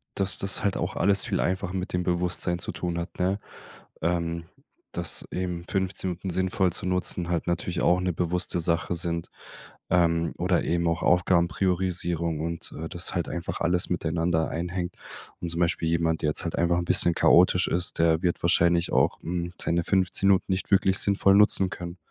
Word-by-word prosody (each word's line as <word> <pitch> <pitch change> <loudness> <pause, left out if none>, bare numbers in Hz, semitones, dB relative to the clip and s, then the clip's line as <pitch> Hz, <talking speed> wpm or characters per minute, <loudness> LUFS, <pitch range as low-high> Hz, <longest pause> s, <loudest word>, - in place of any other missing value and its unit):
dass 100 +1 +2
das 95 0 +1
halt 100 -1 0
auch 90 +3 -3
alles 100 0 +2
viel - - -1
einfach 95 0 -2
mit 95 -1 -4
dem 90 0 -1
Bewusstsein 90 0 0
zu - - -4
tun 85 -1 -4
hat, 85 +1 -6
ne? 95 +3 0 0.6
Ähm, 85 0 -2 0.5
dass 85 -2 0
eben 90 -2 -4
15 95 -1 -2
Minuten 90 +2 -6
sinnvoll 95 0 0
zu 85 - 0
nutzen 90 -1 0
halt 85 -2 -1
natürlich 85 0 -2
auch 90 - +3
'ne 90 -1 -1
bewusste 90 +1 -1
Sache 85 +1 -1
sind, 85 0 -3 0.6
ähm, 85 -2 +1
oder - - 0
eben 85 0 0
auch 85 +1 -1
Aufgabenpriorisierung 85 -2 0
und, 85 +1 -4
äh, 80 - -5
dass 85 +1 -2
halt 85 -2 -2
einfach 85 0 -5
alles 90 +1 +2
miteinander 80 -1 -1
einhängt. 90 +1 -4 0.5
Und 85 - -4
zum 85 +1 -2
Beispiel 85 -1 0
jemand, 80 -1 0
der 75 - +1
jetzt 75 - -2
halt 85 - -3
einfach 85 0 +1
'n 85 - -3
bisschen 85 0 +6
chaotisch 90 +1 +4
ist, 90 0 0
der 80 -1 +3
wird 90 -1 -1
wahrscheinlich 85 0 +2
auch, - - +1
hm, 85 0 -4
seine 85 0 +1
15 95 +1 +1
Minuten 95 -1 +3
nicht 95 +2 -3
wirklich 95 0 +3
sinnvoll 100 -1 +3
nutzen 100 -2 +5
können. 85 -1 -8
85 Hz, 180 wpm, -26 LUFS, 85-90 Hz, 0.6 s, bisschen